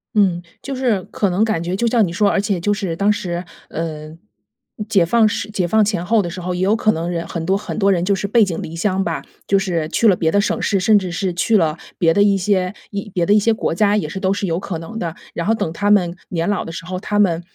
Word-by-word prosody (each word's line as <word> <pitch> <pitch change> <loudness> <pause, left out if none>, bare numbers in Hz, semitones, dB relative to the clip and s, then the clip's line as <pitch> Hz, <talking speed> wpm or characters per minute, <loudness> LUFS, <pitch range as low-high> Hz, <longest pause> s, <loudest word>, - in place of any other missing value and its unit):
嗯， 190 -5 +3 0.2
就 275 - -5
是 245 -7 0
可 200 - 0
能 185 +4 +1
感 220 -7 0
觉 175 +2 -2
就 235 - -1
像 230 -2 +3
你 - - -5
说 205 +3 +3
而 - - +1
且 200 -1 0
就 205 +5 +1
是 195 -5 -3
当 200 +4 +2
时 180 -4 -3 0.3
呃， 155 -2 -5
嗯 160 +2 -14 0.7
解 195 -6 +4
放 225 +6 +3
时 210 0 -3
解 190 -4 0
放 220 +4 +3
前 200 -4 -1
后 220 +2 +3
的 175 - -4
时 180 +2 -7
候， 180 +1 -3
也 180 - -3
有 200 +3 +3
可 220 -1 +2
能 165 -2 -3
人 170 -1 -3
很 165 -2 -4
多， 190 +3 +2
很 205 - -6
多 200 -1 +3
人 175 -3 +1
就 200 +2 +2
是 195 +1 -2
背 225 +2 +4
井 180 -5 -2
离 160 - -7
乡 190 +2 0
吧， - - -2 0.3
就 195 - +3
是 175 -5 -1
去 180 - 0
了 190 - +4
别 160 - +1
的 200 - +3
省 - - -1
市， 195 -3 +1
甚 215 +1 +5
至 185 -2 -5
是 185 -1 -1
去 200 +6 +1
了 165 -5 +2 0.2
别 165 -2 +3
的 200 - +3
一 200 -1 +3
些 185 -1 0 0.2
一 200 0 -5
别 175 -2 +1
的 205 - +3
一 210 - +6
些 225 +2 +2
国 220 - -1
家 205 +3 +2
也 165 -8 -1
是 190 - -5
都 190 0 +1
是 200 - -2
有 170 -2 -1
可 185 -3 -4
能 220 +8 -7
的。 165 -4 -4 0.2
然 170 +2 -3
后 225 - +4
等 205 -7 -2
他 205 +5 -1
们 180 -4 +3
年 170 +1 -2
老 205 - -1
的 165 - -7
时 165 - -7
候， 185 +1 -4
他 205 +2 -1
们 175 -5 +2
190 Hz, 310 characters per minute, -19 LUFS, 170-210 Hz, 0.7 s, 一